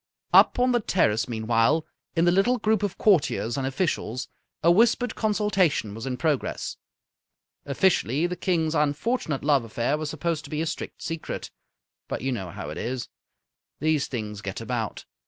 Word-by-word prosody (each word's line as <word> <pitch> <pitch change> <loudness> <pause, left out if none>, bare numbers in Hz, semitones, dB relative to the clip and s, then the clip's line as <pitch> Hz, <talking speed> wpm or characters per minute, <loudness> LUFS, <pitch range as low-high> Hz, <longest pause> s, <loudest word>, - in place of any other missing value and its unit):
Up - - +7
on 250 +1 +3
the 240 - +3
terrace, 140 - +1
meanwhile, 115 +6 +2 0.3
in 165 0 +3
the 175 - +5
little 195 +8 +3
group 220 -3 +1
of 205 -3 -2
courtiers 150 - +2
and 135 -1 -1
officials, 135 - -2 0.4
a 170 - +6
whispered 230 +4 +3
consultation 200 - +1
was 115 +4 -6
in 125 -1 -2
progress. 145 0 -1 0.9
Officially, 145 -1 +2
the 180 +1 -2
King's 165 -3 0
unfortunate 150 - 0
love 140 -3 +3
affair 120 +6 -1
was 155 -1 -3
supposed 160 0 -2
to - - -10
be 150 - -3
a 160 - 0
strict 165 - -5
secret. 165 -1 -5 0.6
But - - -4
you 135 +2 -1
know 95 -8 -3
how 85 -5 -6
it - - -6
is. 120 +1 -3 0.7
These 155 -1 +1
things 105 -4 -5
get 100 -1 -5
about. 115 -2 -3
150 Hz, 165 wpm, -26 LUFS, 120-180 Hz, 0.9 s, Up